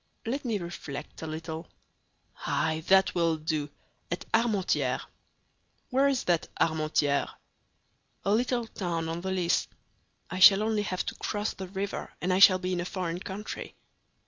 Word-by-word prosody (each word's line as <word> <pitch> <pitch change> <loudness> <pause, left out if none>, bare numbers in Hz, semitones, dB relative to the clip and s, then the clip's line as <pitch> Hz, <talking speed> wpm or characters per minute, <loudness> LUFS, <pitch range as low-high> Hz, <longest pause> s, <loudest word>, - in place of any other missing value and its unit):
"Let 260 +5 -2
me 225 -3 0
reflect 160 -5 -7
a 160 - -4
little! 160 +1 -5 0.8
Ay, 160 0 0
that 190 0 +5
will 165 -2 +2
do—at 155 +2 -5
Armentières." 220 -5 +2 0.9
"Where 270 +2 +4
is 270 -3 +1
that 175 -2 +1
Armentières?" 155 -3 +1 1.0
"A 200 - +3
little 240 +1 +1
town 170 -6 -3
on 165 +1 -3
the 190 - -3
Lys; 180 -2 +1 0.6
I 180 - -5
shall 195 +2 +9
only 215 -1 +1
have 185 -3 -2
to - - -3
cross 210 0 -2
the 190 - -7
river, 195 +2 -4
and 185 +1 0
I 185 - +2
shall 190 -1 +9
be 185 0 -2
in 175 - 0
a - - -2
foreign 180 -2 -3
country." 195 +3 -6
185 Hz, 150 wpm, -29 LUFS, 165-205 Hz, 1.0 s, shall